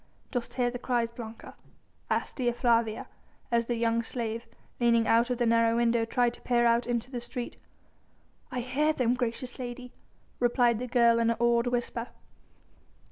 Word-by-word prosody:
"Dost 245 Hz, -3 st, -3 dB
hear 245 Hz, -1 st, +1 dB
the 245 Hz, -, -6 dB
cries, 240 Hz, -2 st, 0 dB
Blanca?" 230 Hz, -1 st, -9 dB, 0.6 s
asked -, -, -1 dB
Dea 245 Hz, -3 st, +1 dB
Flavia, 230 Hz, -2 st, +1 dB, 0.4 s
as 235 Hz, -1 st, +2 dB
the 240 Hz, -, 0 dB
young 230 Hz, 0 st, +1 dB
slave, 230 Hz, -1 st, -4 dB, 0.3 s
leaning 235 Hz, -1 st, +3 dB
out 230 Hz, +3 st, +3 dB
of 250 Hz, -, 0 dB
the 240 Hz, -, +1 dB
narrow 230 Hz, 0 st, +3 dB
window 235 Hz, -1 st, +2 dB
tried 240 Hz, +1 st, +1 dB
to -, -, -14 dB
peer 240 Hz, -1 st, +2 dB
out 235 Hz, +1 st, +3 dB
into 240 Hz, +1 st, -2 dB
the 245 Hz, -2 st, -4 dB
street. 240 Hz, 0 st, -6 dB, 1.0 s
"I 250 Hz, -1 st, -2 dB
hear 290 Hz, +5 st, +1 dB
them, 245 Hz, -4 st, +1 dB
gracious 250 Hz, 0 st, -3 dB
lady," 250 Hz, 0 st, -6 dB, 0.5 s
replied 240 Hz, -2 st, +3 dB
the 250 Hz, -, -4 dB
girl 235 Hz, -1 st, +4 dB
in 230 Hz, 0 st, +2 dB
an 230 Hz, -, 0 dB
awed 235 Hz, 0 st, +3 dB
whisper. 240 Hz, -1 st, -2 dB
235 Hz, 170 wpm, -29 LUFS, 230-245 Hz, 1.0 s, girl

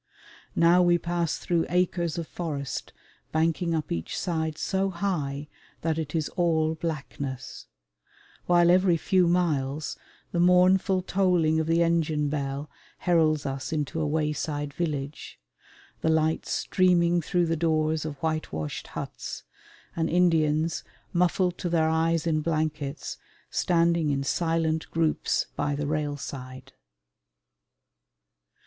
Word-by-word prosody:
Now 170 Hz, +2 st, +5 dB
we 175 Hz, -1 st, +4 dB
pass 170 Hz, -2 st, -1 dB
through 170 Hz, -2 st, 0 dB
acres 175 Hz, -1 st, 0 dB
of 165 Hz, -2 st, -3 dB
forest 145 Hz, -6 st, -4 dB, 0.4 s
banking 165 Hz, +1 st, +1 dB
up 155 Hz, -2 st, -3 dB
each 80 Hz, -1 st, -3 dB
side 160 Hz, -3 st, -2 dB
so 195 Hz, +2 st, 0 dB
high 155 Hz, -6 st, -2 dB, 0.3 s
that 160 Hz, 0 st, 0 dB
it 155 Hz, 0 st, -4 dB
is 155 Hz, -2 st, 0 dB
all 160 Hz, -3 st, +1 dB
blackness; 140 Hz, -5 st, -5 dB, 0.8 s
while 175 Hz, -1 st, +5 dB
every 180 Hz, -1 st, +4 dB
few 185 Hz, +2 st, +2 dB
miles 155 Hz, -5 st, 0 dB, 0.4 s
the 170 Hz, -, -1 dB
mournful 185 Hz, +1 st, +4 dB
tolling 180 Hz, -5 st, +2 dB
of 160 Hz, -, -1 dB
the 165 Hz, +1 st, +3 dB
engine 155 Hz, -3 st, +1 dB
bell 140 Hz, 0 st, -3 dB, 0.3 s
heralds 160 Hz, -4 st, +2 dB
us 135 Hz, -1 st, -4 dB
into 155 Hz, +1 st, -2 dB
a 155 Hz, -, 0 dB
wayside 150 Hz, -1 st, -1 dB
village, 150 Hz, -3 st, -4 dB, 0.6 s
the 160 Hz, -, +1 dB
lights 160 Hz, 0 st, +1 dB
streaming 175 Hz, -2 st, +2 dB
through 175 Hz, +2 st, +1 dB
the 165 Hz, 0 st, 0 dB
doors 155 Hz, -1 st, +1 dB
of 155 Hz, -2 st, -4 dB
whitewashed 155 Hz, -, -3 dB
huts, -, -, -6 dB, 0.5 s
and 165 Hz, -1 st, 0 dB
Indians, 165 Hz, -2 st, +2 dB, 0.3 s
muffled 180 Hz, 0 st, +1 dB
to 175 Hz, -, -2 dB
their 160 Hz, -2 st, +2 dB
eyes 165 Hz, 0 st, +1 dB
in 155 Hz, -2 st, +1 dB
blankets, 155 Hz, -3 st, -2 dB, 0.3 s
standing 170 Hz, -2 st, +2 dB
in 140 Hz, -1 st, 0 dB
silent 165 Hz, +1 st, 0 dB
groups 160 Hz, -1 st, +1 dB
by 145 Hz, 0 st, -1 dB
the 145 Hz, +1 st, -2 dB
railside. 145 Hz, -3 st, -4 dB
160 Hz, 125 wpm, -27 LUFS, 150-170 Hz, 0.8 s, Now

